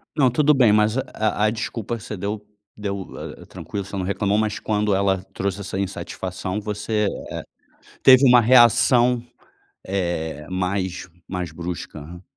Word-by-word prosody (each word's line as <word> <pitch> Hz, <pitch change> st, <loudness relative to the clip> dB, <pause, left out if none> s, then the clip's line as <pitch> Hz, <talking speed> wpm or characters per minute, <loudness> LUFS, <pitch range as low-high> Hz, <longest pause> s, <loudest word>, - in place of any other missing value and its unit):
Não, 140 Hz, -5 st, +4 dB
tudo 150 Hz, +5 st, +3 dB
bem, 125 Hz, -6 st, +5 dB
mas 105 Hz, +2 st, +3 dB
a 110 Hz, -5 st, -1 dB
a -, -, +4 dB
desculpa 115 Hz, +1 st, -4 dB
você 105 Hz, 0 st, -7 dB
deu 105 Hz, +2 st, -4 dB, 0.3 s
deu, 100 Hz, -2 st, -4 dB, 0.4 s
ah, -, -, -12 dB
tranquilo, 100 Hz, -2 st, -6 dB
você 100 Hz, -, -8 dB
não 95 Hz, -, -2 dB
reclamou, 100 Hz, +2 st, 0 dB
mas 110 Hz, -1 st, 0 dB
quando 105 Hz, -1 st, 0 dB
ela 95 Hz, -1 st, +1 dB
trouxe 100 Hz, 0 st, -2 dB
essa 95 Hz, -1 st, -5 dB
insatisfação, 95 Hz, 0 st, -4 dB
você, 105 Hz, +1 st, -2 dB
eh, -, -, -8 dB, 0.8 s
teve 130 Hz, +1 st, +8 dB
uma 125 Hz, 0 st, +7 dB
reação, 120 Hz, +1 st, +5 dB, 0.6 s
eh, 85 Hz, -5 st, -3 dB
mais 95 Hz, 0 st, -2 dB, 0.2 s
mais 90 Hz, -3 st, -4 dB
brusca. 85 Hz, 0 st, -7 dB
100 Hz, 145 wpm, -22 LUFS, 95-110 Hz, 0.8 s, teve